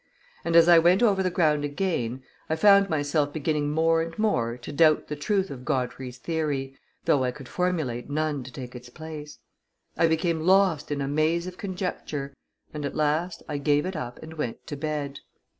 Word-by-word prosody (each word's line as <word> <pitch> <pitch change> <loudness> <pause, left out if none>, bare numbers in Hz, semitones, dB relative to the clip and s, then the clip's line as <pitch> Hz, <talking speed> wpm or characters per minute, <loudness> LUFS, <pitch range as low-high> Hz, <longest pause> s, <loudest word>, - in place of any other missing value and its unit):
And, 170 0 0
as 170 0 +8
I 170 -1 +8
went 175 +6 +4
over 200 -4 +4
the 185 - +1
ground 155 -4 +2
again, 145 -5 -2 0.3
I 160 - +1
found 200 +2 +6
myself 145 -1 0
beginning 150 -1 -1
more 165 +2 +2
and 165 0 -5
more 120 - 0
to 125 +4 -8
doubt 155 +1 +3
the 150 - -2
truth 195 +5 0
of 130 -2 -8
Godfrey's 130 -2 -3
theory, 140 -3 -2 0.3
though 135 -3 +3
I 125 - +1
could 135 0 -9
formulate 155 -10 -2
none 150 -2 -1
to 130 - -9
take 125 -1 -8
its 125 0 -10
place; 155 +1 -9 0.6
I 165 - +3
became 160 +1 +1
lost 185 -2 +3
in 145 -1 -2
a 135 - -1
maze 155 +4 +1
of 185 0 -8
conjecture, 180 -7 -4 0.4
and, 150 -1 -5
at 140 - -3
last, 155 +4 0
I 150 -2 -3
gave 145 +1 +2
it 185 0 -4
up 125 -6 -5
and 160 0 -9
went 150 -8 -4
to 150 - -5
bed. 145 -1 -3
155 Hz, 190 wpm, -26 LUFS, 140-170 Hz, 0.6 s, as